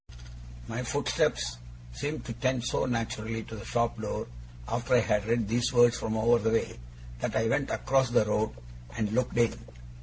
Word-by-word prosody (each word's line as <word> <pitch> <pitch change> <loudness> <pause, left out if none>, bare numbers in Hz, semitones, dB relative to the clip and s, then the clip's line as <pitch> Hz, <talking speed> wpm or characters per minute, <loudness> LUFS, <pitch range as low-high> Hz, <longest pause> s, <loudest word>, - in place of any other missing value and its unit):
My - - -3
footsteps - - 0 0.3
seemed 145 - -4
to 115 - -4
tend 130 +1 0
so 125 - 0
naturally 115 -2 -2
to 110 - -9
the 105 - -8
shop 115 -1 -1
door, 105 - -3 0.4
after 120 +2 +1
I 120 - +6
had 105 -2 +1
read 115 -2 +1
these 120 +3 +1
words 120 -1 +6
from 110 0 -2
over 115 +2 +4
the 110 0 +1
way, 115 - 0 0.4
that 110 - -2
I 110 +1 +2
went 135 +4 +1
across 130 -1 +2
the 120 -3 +3
road 105 - 0 0.4
and 105 -1 0
looked 125 +2 0
in. 115 -2 +4
115 Hz, 180 wpm, -29 LUFS, 110-120 Hz, 0.4 s, I